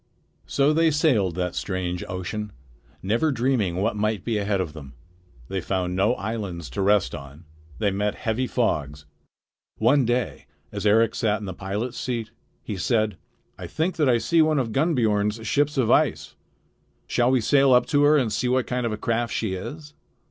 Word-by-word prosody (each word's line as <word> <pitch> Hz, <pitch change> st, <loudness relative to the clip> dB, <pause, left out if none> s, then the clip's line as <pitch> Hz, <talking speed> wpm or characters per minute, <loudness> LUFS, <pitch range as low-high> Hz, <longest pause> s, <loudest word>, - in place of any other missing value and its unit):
So 140 Hz, +2 st, +2 dB
they 165 Hz, +1 st, +4 dB
sailed 130 Hz, -, +2 dB
that 90 Hz, -1 st, -2 dB
strange 90 Hz, -2 st, -3 dB
ocean, 100 Hz, +3 st, -4 dB, 0.5 s
never 115 Hz, +11 st, +1 dB
dreaming 120 Hz, -8 st, 0 dB
what 105 Hz, +5 st, 0 dB
might 105 Hz, -2 st, -1 dB
be 115 Hz, -3 st, 0 dB
ahead 100 Hz, -1 st, 0 dB
of 85 Hz, -5 st, -3 dB
them. 70 Hz, -4 st, -10 dB, 0.5 s
They 95 Hz, +3 st, -3 dB
found 90 Hz, 0 st, -2 dB
no 100 Hz, +6 st, +2 dB
islands 100 Hz, -, -5 dB
to 100 Hz, -, -3 dB
rest 100 Hz, -8 st, +2 dB
on. 70 Hz, +4 st, -10 dB, 0.3 s
They 105 Hz, -2 st, +1 dB
met 105 Hz, +2 st, -1 dB
heavy 115 Hz, +3 st, -2 dB
fogs. 75 Hz, -, -1 dB, 0.7 s
One 130 Hz, +5 st, +4 dB
day 120 Hz, 0 st, -2 dB, 0.2 s
as -, -, -2 dB
Eric 115 Hz, +2 st, +4 dB
sat 105 Hz, -2 st, 0 dB
in 105 Hz, -, -7 dB
the 95 Hz, -, -5 dB
pilot's 105 Hz, +7 st, -4 dB
seat, 115 Hz, -3 st, -3 dB, 0.3 s
he 105 Hz, -, -5 dB
said: 110 Hz, +1 st, +1 dB, 0.4 s
"I -, -, -6 dB
think 165 Hz, +4 st, -2 dB
that 150 Hz, -4 st, +3 dB
I 120 Hz, -, +4 dB
see 165 Hz, +7 st, +2 dB
one 155 Hz, -1 st, +3 dB
of 125 Hz, -4 st, -1 dB
Gunnbiorn's 110 Hz, -7 st, +1 dB
ships 145 Hz, +5 st, +1 dB
of 125 Hz, -4 st, +2 dB
ice. -, -, +1 dB, 0.7 s
Shall 120 Hz, 0 st, +1 dB
we 130 Hz, -1 st, +3 dB
sail 135 Hz, +3 st, +4 dB
up 125 Hz, -1 st, +5 dB
to 145 Hz, -2 st, +3 dB
her 150 Hz, +1 st, +5 dB
and 120 Hz, -6 st, 0 dB
see 125 Hz, -, 0 dB
what 125 Hz, 0 st, +1 dB
kind 125 Hz, -1 st, -1 dB
of -, -, -3 dB
a 105 Hz, -, -3 dB
craft 115 Hz, +2 st, -1 dB
she 110 Hz, -4 st, -1 dB
is?" 150 Hz, -, -7 dB
110 Hz, 185 wpm, -24 LUFS, 95-130 Hz, 0.7 s, up